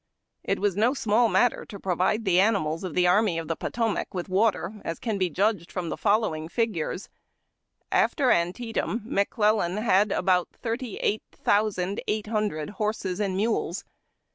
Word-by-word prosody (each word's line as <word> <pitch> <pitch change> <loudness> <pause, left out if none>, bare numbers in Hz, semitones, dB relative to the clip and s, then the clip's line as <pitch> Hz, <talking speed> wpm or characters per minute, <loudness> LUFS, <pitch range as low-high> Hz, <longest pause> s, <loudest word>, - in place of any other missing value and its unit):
It - - 0
was 200 -3 0
no 230 +7 +2
small 230 -1 +2
matter 245 +1 +2
to 200 - -9
provide 190 +5 0
the 185 -2 +4
animals 190 -6 +1
of 180 -5 -5
the 180 - +3
Army 180 0 +3
of 165 -1 -4
the 165 - -1
Potomac 225 -1 -2
with 180 +1 -4
water, 205 0 0
as 165 - -3
can 220 -4 -3
be 185 -1 +1
judged 195 0 0
from 180 -3 -3
the - - -2
following 200 -7 0
figures: 205 -4 -2 0.8
After 265 -5 +3
Antietam 225 +5 -1
McClellan 210 -3 +1
had 210 -2 +3
about 180 -2 +2
thirty 235 -1 -4
eight 215 - +1
thousand 205 -2 0
eight 215 0 -1
hundred 210 -7 -2
horses 210 -3 -1
and 195 -3 -1
mules. 210 -4 -1
205 Hz, 160 wpm, -26 LUFS, 180-220 Hz, 0.8 s, the